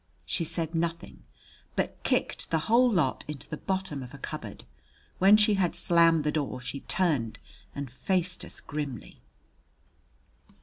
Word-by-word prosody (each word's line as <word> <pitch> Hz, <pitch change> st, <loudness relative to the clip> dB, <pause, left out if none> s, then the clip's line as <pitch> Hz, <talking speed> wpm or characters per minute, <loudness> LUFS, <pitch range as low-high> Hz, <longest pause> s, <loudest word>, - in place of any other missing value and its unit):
She 170 Hz, -, -1 dB
said 165 Hz, 0 st, -3 dB
nothing, 165 Hz, 0 st, -3 dB, 0.5 s
but -, -, -2 dB
kicked -, -, -1 dB
the 165 Hz, -, +2 dB
whole 240 Hz, +2 st, +5 dB
lot 160 Hz, -, +1 dB
into 150 Hz, -3 st, -6 dB
the -, -, -4 dB
bottom 190 Hz, -7 st, -2 dB
of 130 Hz, +2 st, -9 dB
a -, -, -9 dB
cupboard. -, -, -7 dB, 0.6 s
When 195 Hz, +3 st, +8 dB
she 210 Hz, 0 st, +4 dB
had 190 Hz, -4 st, +1 dB
slammed 165 Hz, -2 st, +5 dB
the 150 Hz, -, +1 dB
door, 145 Hz, -4 st, -2 dB
she 125 Hz, +2 st, -5 dB
turned 145 Hz, -13 st, 0 dB, 0.4 s
and 140 Hz, -1 st, -4 dB
faced 180 Hz, +6 st, -1 dB
us -, -, -8 dB
grimly. 145 Hz, -5 st, -6 dB
165 Hz, 145 wpm, -28 LUFS, 145-185 Hz, 0.6 s, When